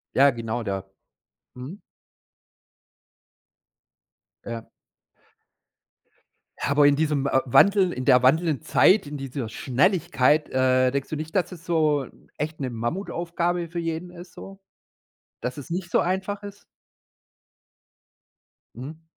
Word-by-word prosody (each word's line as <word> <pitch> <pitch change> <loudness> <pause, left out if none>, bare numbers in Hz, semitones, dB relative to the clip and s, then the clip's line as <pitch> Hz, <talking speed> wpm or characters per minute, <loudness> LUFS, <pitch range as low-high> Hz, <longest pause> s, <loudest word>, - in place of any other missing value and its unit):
Ja, 140 +1 +6
genau, 115 0 -4
da. 95 -1 -4 0.6
Mhm. 135 +11 -9 2.7
Ja. 115 -1 -6 2.0
Ja, - - -1
aber 145 0 +5
in 145 - +4
diesem, 150 -2 0
äh, 135 - +3
Wandel 190 - +4
in 130 - -5
der 125 -2 +5
wandelnden 155 +2 +3
Zeit, 190 -1 +4
in 145 0 -6
dieser 135 -4 -5
Schnelligkeit, 150 - +1
äh, 130 0 +2
denkst 140 0 -3
du - - -3
nicht, 155 +4 -7
dass 185 0 +1
es 175 -1 -11
so, 155 -6 +1 0.3
echt 155 +1 -4
'ne 130 - -2
Mammutaufgabe 170 - -2
für 170 +1 -5
jeden 165 +1 -4
ist 175 0 -12
so? 195 0 -11 0.8
Dass 125 +2 -4
es 145 - -9
nicht 175 0 -4
so - - +3
einfach 190 +3 -2
ist? 200 0 -10 2.1
Mhm. 150 +7 -9
150 Hz, 120 wpm, -24 LUFS, 130-175 Hz, 2.7 s, Ja